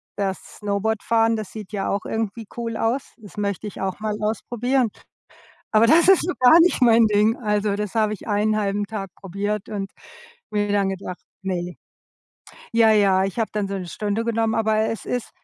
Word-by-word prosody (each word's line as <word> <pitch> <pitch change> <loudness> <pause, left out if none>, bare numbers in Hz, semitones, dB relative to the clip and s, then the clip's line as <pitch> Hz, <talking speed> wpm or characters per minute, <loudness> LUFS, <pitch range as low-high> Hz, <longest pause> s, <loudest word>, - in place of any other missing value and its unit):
das 195 -2 -4
Snowboardfahren, 220 +2 +1
das 215 -3 -5
sieht 210 -3 -9
ja 200 -2 -2
auch 200 - -2
irgendwie 220 0 -3
cool 230 -1 -4
aus, 240 +4 -1
das 210 -4 -14
möchte 200 0 -2
ich 205 - -7
auch 190 +1 -3
mal 215 -1 -2
ausprobieren. 240 +3 0 0.8
Aber 220 +1 +5
das 330 +7 +5
ist 385 -2 +6
so 360 - -1
gar 255 +6 +8
nicht 340 -5 +3
mein 230 -2 +6
Ding, 215 +2 +3
also, 210 -3 0
das 210 0 -4
habe 215 -2 +2
ich 210 - -8
1/2 205 -1 +1
Tag 205 -2 -5
probiert 200 +2 -4
und 200 -2 -4 0.6
mir 205 0 0
dann 200 -1 +2
gedacht, 185 -1 -6 0.2
ne. 180 -2 -3 1.0
Ja, 230 -1 +5
ja, 195 -3 +4
ich 195 +4 -4
habe 225 - -1
dann 210 -1 -1
so 195 - -4
'ne 185 -2 -5
Stunde 210 +5 -2
genommen, 225 -1 0
aber 220 -1 +1
es 225 - -5
ist 245 -2 -3
210 Hz, 185 wpm, -23 LUFS, 200-225 Hz, 1.0 s, gar